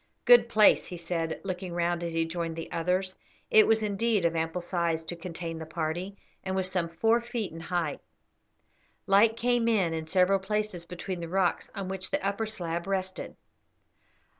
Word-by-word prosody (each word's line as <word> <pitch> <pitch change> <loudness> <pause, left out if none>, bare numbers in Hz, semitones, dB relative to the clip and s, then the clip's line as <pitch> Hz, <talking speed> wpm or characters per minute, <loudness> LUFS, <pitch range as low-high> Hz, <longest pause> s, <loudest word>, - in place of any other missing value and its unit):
"Good 240 -2 +7
place," 215 -2 +5
he 180 - -6
said, 165 -1 -3
looking 185 -2 -4
round 175 0 0
as 170 -1 -3
he 165 0 +1
joined 165 0 -3
the 165 - -7
others. 185 +3 0 0.4
It 215 - +7
was 220 0 +3
indeed 210 -1 +1
of 170 0 +1
ample 165 +2 -1
size 170 -2 -1
to 175 - -5
contain 165 -1 -6
the 160 - -6
party, 170 +5 -3 0.3
and 190 0 -2
was 185 -1 -1
some 175 -3 0
four 225 +8 +2
feet 235 -3 -4
in 165 - -8
height. 165 -3 -2 1.0
Light 215 +3 +4
came 240 0 +1
in 195 -8 +2
in 160 -1 -4
several 185 +3 +3
places 195 -3 -3
between 180 +1 -5
the 170 -1 -6
rocks 185 -1 0
on 195 -2 -4
which 190 0 -2
the 195 - -1
upper 200 +3 -1
slab 175 -4 -4
rested. 190 -1 -3
180 Hz, 180 wpm, -28 LUFS, 170-200 Hz, 1.0 s, Good